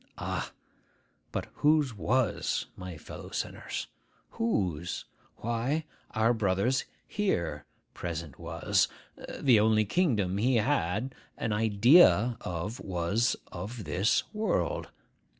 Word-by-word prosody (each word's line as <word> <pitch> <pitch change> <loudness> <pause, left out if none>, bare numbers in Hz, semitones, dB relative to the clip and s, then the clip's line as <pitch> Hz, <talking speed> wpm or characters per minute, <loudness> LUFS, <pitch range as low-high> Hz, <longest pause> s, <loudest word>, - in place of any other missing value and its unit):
Ah! - - -3 0.8
but - - -2
whose 150 -4 +3
was, 115 +1 0
my 90 -3 -7
fellow - - -9
sinners? - - -4 0.5
Whose? 90 -7 -1 0.3
Why, 120 +7 -1 0.3
our 110 +2 +4
brother's 110 +4 +1 0.2
here 85 - -1 0.3
present 85 -4 -5
was. - - +1 0.5
The 125 -6 +5
only 110 0 +4
kingdom 105 - +1
he 125 +4 +3
had 115 - +1 0.2
an 110 - -1
idea 115 - +6
of 90 +7 -4
was 95 +6 0 0.2
of 105 +6 -6
this 95 +5 +2
world. 220 - 0
110 Hz, 100 wpm, -29 LUFS, 95-125 Hz, 0.8 s, idea